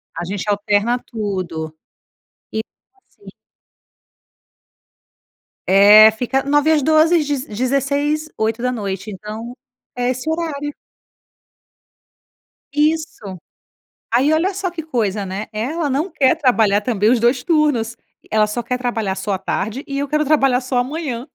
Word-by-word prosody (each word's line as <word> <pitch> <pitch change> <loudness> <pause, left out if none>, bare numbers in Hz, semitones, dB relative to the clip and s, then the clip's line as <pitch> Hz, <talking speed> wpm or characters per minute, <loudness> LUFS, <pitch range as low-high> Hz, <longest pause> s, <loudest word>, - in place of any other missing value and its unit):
A - - -4
gente 195 +3 -4
alterna 205 +3 +1
tudo 185 -9 -5 0.8
e 220 - -1 0.5
sim. 410 - -19 2.4
É, 205 +3 +8
fica 250 +4 -1
9h 290 +2 +2
às 310 -2 +3
12h; 315 +4 +4
deze 290 -3 -2
dezesseis, 280 +6 -1
8h. 220 -3 -2
Então 215 +4 -7 0.4
é 245 0 +1
esse 255 +5 -4
horário. 315 -3 -3 2.0
Isso. 300 - -1 0.8
Aí, 265 +6 +3
olha, 350 +5 +1
só 380 -1 -2
que 340 -2 -6
coisa, 215 -9 -2
né? 195 +3 -5
Ela 285 +8 -2
não 300 +8 -1
quer 280 -2 +2
trabalhar 220 -9 +3
também 215 -1 +1
os 245 -1 +3
2 245 +2 +2
turnos. 290 -9 +1 0.3
Ela 215 -1 +3
só 210 +3 -3
quer 250 +2 -3
trabalhar 225 -6 -2
só 205 - -3
à 190 - -1
tarde, 215 +7 -3
e 275 0 -4
eu 285 0 -2
quero 300 +2 +1
trabalhar 270 -4 +3
só 250 -1 0
manhã. 265 -3 -5
250 Hz, 130 wpm, -19 LUFS, 215-295 Hz, 2.4 s, É